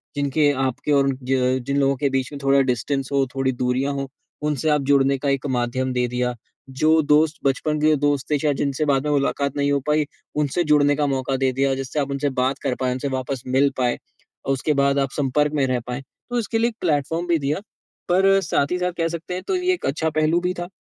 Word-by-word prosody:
जिनके 145 +1 +2
आपके 130 +2 -1
और 140 -1 +4
उन, 135 -1 -1
ज 130 0 +1
जिन 140 0 0
लोगों 140 0 +2
के 140 0 0
बीच 135 0 -1
में 145 - -7
थोड़ा 135 0 +4
डिस्टेंस 130 +3 -1
हो, 140 -1 +2
थोड़ी 135 0 +1
दूरियाँ 125 +2 -1
हो, 140 0 -3 0.3
उनसे 150 0 0
आप 150 -1 +2
जुड़ने 140 -1 +4
का 140 +2 -2
एक 140 0 -1
माध्यम 125 +2 -1
दे 125 0 +1
दिया। 125 0 -1 0.4
जो 155 +4 +3
दोस्त 150 +1 +3
बचपन 150 +3 0
के 155 0 +4
दोस्त 145 -2 0
थे, 150 - +3
शायद 145 -1 +1
जिनसे 140 +2 -1
बाद 135 -1 +1
में 150 - 0
मुलाकात 140 0 0
नहीं 145 0 +1
हो 140 - +2
पाई, 150 0 +2 0.3
उनसे 150 +3 0
जुड़ने 145 -1 +4
का 150 +1 0
मौका 135 -1 -1
दे 130 0 +1
दिया, 135 +1 +1
जिससे 135 +3 -3
आप 140 -1 -1
उनसे 140 +1 -1
बात 130 +2 0
कर 135 -3 0
पाएँ, 125 -1 0 0.2
वापस 130 -1 -3
मिल 135 +2 +3
पाएँ 125 -2 +1 0.5
और 135 - +1
उसके 140 +3 0
बाद 140 0 +2
आप 135 -1 0
संपर्क 145 +1 +1
में 145 -3 +2
रह 130 -1 0
पाएँ। 125 +2 -4 0.3
तो 245 0 0
इसके 225 0 -2
लिए 230 +1 +2
एक 230 - -12
प्लेटफॉर्म 165 +1 0
भी 170 -1 +3
दिया, 145 +5 -1 0.5
पर 195 +2 +4
साथ 140 -5 0
ही 180 - +1
साथ 180 0 0
कह 165 - +1
सकते 170 +2 -5
हैं, 180 - -4
तो 380 - +1
ये 365 0 +1
एक 360 - -5
अच्छा 160 +3 0
पहलू 155 +2 +2
भी 180 +1 -1
था। 175 -1 -5
140 Hz, 235 wpm, -22 LUFS, 135-150 Hz, 0.5 s, और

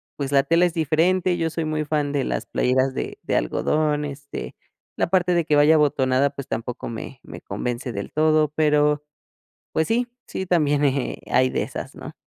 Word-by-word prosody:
pues, 140 -1 -4
la 140 -1 +5
tela 165 +5 +3
es 175 - -1
diferente. 175 +3 +2
Yo 165 -1 -1
soy 165 0 -2
muy 155 0 -1
fan 150 -1 0
de 140 -2 +1
las - - -3
playeras 130 +1 +1
de - - -4
de - - -2
algodón, 150 - 0
este, 145 0 -7 0.4
la - - 0
parte 180 -1 +3
de 170 -2 +2
que 150 - +2
vaya 145 +2 +6
abotonada, 140 -2 +2
pues, 140 - -8
tampoco 115 +2 -4
me 120 +3 -7
me - - -11
convence 125 +1 -4
del 100 0 -5
todo, 155 0 +3
pero, 150 -1 +2 0.7
pues, 160 - +1
sí, 240 +2 0 0.2
sí 190 - -4
también, 150 -5 +2
eh, 140 -2 0
hay 130 +1 +3
de - - -1
esas, - - -6
¿no? - - -9
150 Hz, 190 wpm, -23 LUFS, 135-160 Hz, 0.7 s, vaya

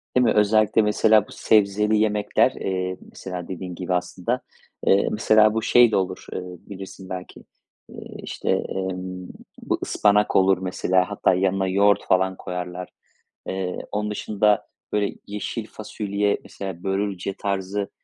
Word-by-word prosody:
Değil 125 - +5
mi? - - +3
Özellikle 110 +1 +4
mesela 105 +1 +4
bu - - -15
sebzeli 105 0 +2
yemekler, 105 -1 +2
eee, 95 -1 -3
mesela 90 -2 -7
dediğin 90 -1 -6
gibi 90 +1 -3
aslında, 95 +7 -1 0.5
eee, 100 - +4
mesela 110 0 +4
bu 110 - 0
şey 120 0 +5
de - - +1
olur, 95 -1 -1
eee, - - -3
bilirsin 95 +1 -10
belki. 90 -1 -7 0.5
Eee, - - -12 0.3
işte, - - -5
emm, 90 -1 -2 0.3
bu - - -1
ıspanak 105 0 +2
olur 95 0 +5
mesela. 90 0 0
Hatta 105 -2 +2
yanına 95 +1 +1
yoğurt 100 +2 +3
falan 95 0 +2
koyarlar. 90 0 -5 0.6
Eee, 95 -1 -3
onun 105 0 -2
dışında, 105 0 +1 0.3
böyle 105 -1 0
yeşil 105 +2 -4
fasulye, 105 -1 -2
mesela, 95 -3 -7
börülce 95 -1 -2
tarzı 100 0 -2
95 Hz, 140 wpm, -23 LUFS, 95-105 Hz, 0.6 s, Değil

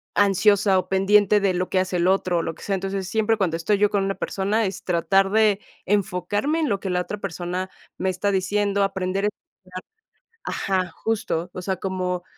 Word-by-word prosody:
ansiosa 200 0 +4
o 185 0 -5
pendiente 205 +2 +4
de 195 -2 +1
lo 180 +1 -2
que 185 - +1
hace 185 -1 -1
el 175 - +2
otro 185 -2 +2
o - - +1
lo 165 -1 -4
que - - -14
sea. 200 - -2
Entonces, 195 0 -3
siempre 220 +2 +1
cuando 185 -5 0
estoy 185 +5 +1
yo 210 0 +3
con 200 -2 +1
una 195 0 -1
persona, 200 +4 -1
es 190 -1 -5
tratar 195 +2 +2
de 215 -1 +3 0.3
enfocarme 205 - 0
en 305 - 0
lo 200 -2 0
que 195 - -4
la 180 0 +1
otra 210 +3 -5
persona 185 -1 -4 0.3
me 190 - 0
está 185 +2 -1
diciendo, 200 +1 0
aprender 195 0 -1
a - - +3 1.2
ajá, 185 -2 -1
justo. 195 -6 -1
O 185 - -6
sea, 190 0 -2
como 185 -2 -3
195 Hz, 200 wpm, -23 LUFS, 185-205 Hz, 1.2 s, ansiosa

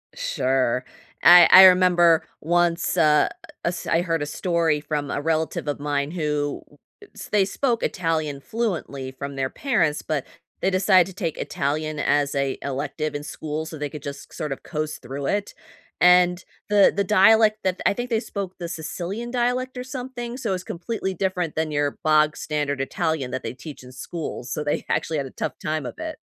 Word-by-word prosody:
Sure. 130 -1 0 0.4
I 175 -1 +9
I 190 - +11
remember 180 -3 +5 0.2
once, 175 +2 +1
uh, 150 -2 +4 0.4
us 175 0 -2
I 165 0 +2
heard 165 -3 -1
a - - -1
story 165 0 0
from 145 -2 -3
a 145 - -2
relative 160 -1 -1
of 145 - -2
mine 145 0 -1
who 150 -4 -2 0.5
s - - -9
they 200 -2 +4
spoke 235 +3 -1
Italian 160 -5 -1
fluently 170 - -3
from 140 +1 -7
their 135 -1 -1
parents, 175 - 0
but 150 -4 -2 0.4
they 190 - +2
decided 185 -1 +4
to 190 - -9
take 170 -6 -3
Italian 150 +2 -2
as 145 -1 +1
a 140 -1 -1
elective, 145 +3 -3
in 145 - -4
school, 155 +1 -5
so 160 0 -8
they 145 0 -3
could 150 0 -9
just 140 0 -8
sort 150 - -4
of 135 - -5
coast 155 -2 -4
through 135 +3 -6
it. 205 0 -1 0.5
And 180 0 +5 0.3
the 205 -1 +5
the 200 - +1
dialect 215 +2 +5
that 185 -1 -1
I - - +4
think 245 +4 -4
they 225 -2 +1
spoke 195 -5 -6
the 170 - -4
Sicilian 185 +9 -5
dialect 250 +1 -1
or 250 - -4
something, 250 -2 -6
so 225 -7 -2
it's 185 -1 -4
completely 190 +2 -4
different 180 -3 -2
than 160 -1 -1
your 145 -1 -1
bog-standard 150 -2 +1
Italian 155 -2 -2
that 130 - -4
they - - -4
teach 140 +1 -10
in 125 - -12
school. 155 +3 -6
So 125 +5 -4
they 145 - -2
actually 160 - 0
had 140 - -2
a - - -12
tough - - -4
time 155 -1 -2
of - - -6
it. 315 0 -6
160 Hz, 185 wpm, -23 LUFS, 145-190 Hz, 0.5 s, I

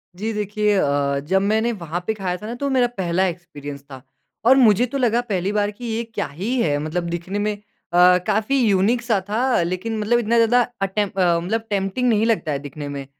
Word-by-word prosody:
जी, 220 +4 -3
देखिए 210 0 0
अ, 140 -4 +1
जब 185 +7 0
मैंने 220 +4 +1
वहाँ 175 -5 -4
पे 220 - +1
खाया 185 -4 -3
था 210 - -10
ना 235 - -4
तो 280 +3 -2
मेरा 255 -2 +3
पहला 185 0 +1
एक्सपीरियंस 145 -5 -7
था 130 -1 -9 0.4
और 260 - +7
मुझे 235 -1 +5
तो 275 +3 -4
लगा 240 -2 +2
पहली 190 0 -1
बार 210 0 0
कि 240 +4 -10
ये 230 +1 -2
क्या 225 0 -4
ही 190 - -3
है? 145 -6 +1
मतलब 160 +4 -3
दिखने 175 +4 -4
में 210 0 0 0.4
अ, 180 +1 +6
काफ़ी 215 +6 +1
युनीक 205 +5 +2
सा 230 -4 +1
था, 245 +2 +1
लेकिन 185 +6 -3
मतलब 225 +3 +2
इतना 235 0 0
ज़्यादा 235 +2 +4 0.2
अटेम्प 195 +1 -1
अ, 175 -2 +3
मतलब 220 +6 -2
टेम्प्टिंग 200 +5 0
नहीं 220 -1 +2
लगता 215 -9 0
है 140 - -1
दिखने 145 +1 -8
में, 140 -1 -6
205 Hz, 215 wpm, -21 LUFS, 175-225 Hz, 0.4 s, और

